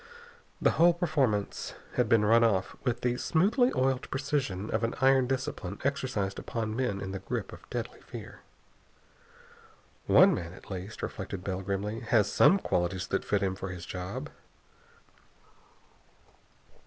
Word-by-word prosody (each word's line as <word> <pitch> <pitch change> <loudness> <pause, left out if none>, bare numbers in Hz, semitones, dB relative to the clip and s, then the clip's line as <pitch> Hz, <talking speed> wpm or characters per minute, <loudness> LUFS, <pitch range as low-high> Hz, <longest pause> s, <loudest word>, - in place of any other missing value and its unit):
The - - +4
whole 170 +1 +5
performance 140 - 0 0.2
had 125 -3 +1
been 110 -2 +4
run 115 +2 +5
off 100 -5 +1
with 120 -2 -1
the 125 0 0
smoothly 220 - +3
oiled 130 0 0
precision 135 -8 -2
of 110 +1 0
an 115 - 0
iron 135 -1 +4
discipline 125 -7 -3
exercised 130 -9 -1
upon 110 -2 -3
men 125 -6 -1
in 95 -1 -5
the 95 - -4
grip 95 - -4
of - - -13
deadly - - -5
fear. - - -10 1.7
"One - - +7
man, 85 0 -4
at 95 - -14
least," 95 +3 -6
reflected 95 -2 -5
Bell 95 -1 -3
grimly, 100 +3 -2
"has 110 -2 +2
some 195 - +6
qualities 90 - -1
that - - 0
fit - - 0
him 95 -1 0
for 95 0 -6
his 90 -2 -7
job." 90 -1 -5
110 Hz, 145 wpm, -29 LUFS, 95-130 Hz, 1.7 s, One